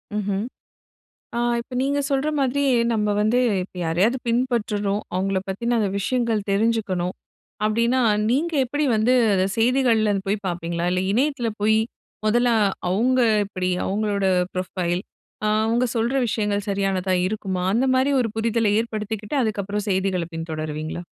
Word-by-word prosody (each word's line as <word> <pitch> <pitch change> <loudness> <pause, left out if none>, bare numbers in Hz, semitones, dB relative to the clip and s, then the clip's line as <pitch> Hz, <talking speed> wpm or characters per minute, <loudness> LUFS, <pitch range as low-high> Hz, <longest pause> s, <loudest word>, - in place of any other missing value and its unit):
ம்ஹ்ம். 205 -1 -1 0.9
ஆ - - 0 0.2
இப்ப 245 +2 -10
நீங்க 280 +1 0
சொல்ற 275 +2 +1
மாதிரி 275 +1 +1 0.3
நம்ம 210 -2 +1
வந்து 215 +4 +2 0.2
இப்ப 185 - -11
யாரையாது 180 +10 +2
பின்பற்றுரும், 215 -4 0
அவங்கள 190 +1 0
பத்தின 235 +5 -1
அந்த 210 -3 +1
விஷயங்கள் 230 -1 0
தெரிஞ்சுக்கணும் 195 -4 0 0.5
அப்டின்னா 235 +4 +2 0.3
நீங்க 310 +7 +1
எப்படி 290 +4 -1
வந்து 220 +4 +3 0.2
அத 185 - +2
செய்திகள்லே 230 -2 +3
அத 195 - 0
போயி 205 +2 +1
பாப்பீங்களா? 170 -1 -2
இல்ல 185 - +1
இணையத்துல 260 0 +1
போயி 220 +1 +3 0.5
மொதல்ல 240 +3 +3 0.4
அவங்க 245 +8 +2 0.2
எப்படி? 185 -2 -3 0.2
அவங்களோட 200 0 0 0.3
ப்ரொஃபைல், 180 -1 -2 0.4
அ - - +2 0.2
அவங்க 235 +2 +2
சொல்ற 230 +3 0
விஷயங்கள் 205 -2 -1
சரியானதா 195 -1 0
இருக்குமா? 190 -3 -3
அந்த 255 +4 +2
மாரி 260 +2 +2
ஒரு 230 -3 -1
புரிதல 225 -1 +1
ஏற்படுத்திக்கிட்டு 220 +1 -4
அதுக்கப்புறம் 205 -2 -2
செய்திகள 190 -2 0
பின்தொடருவீங்களா? 155 0 -4
210 Hz, 135 wpm, -23 LUFS, 190-235 Hz, 0.9 s, வந்து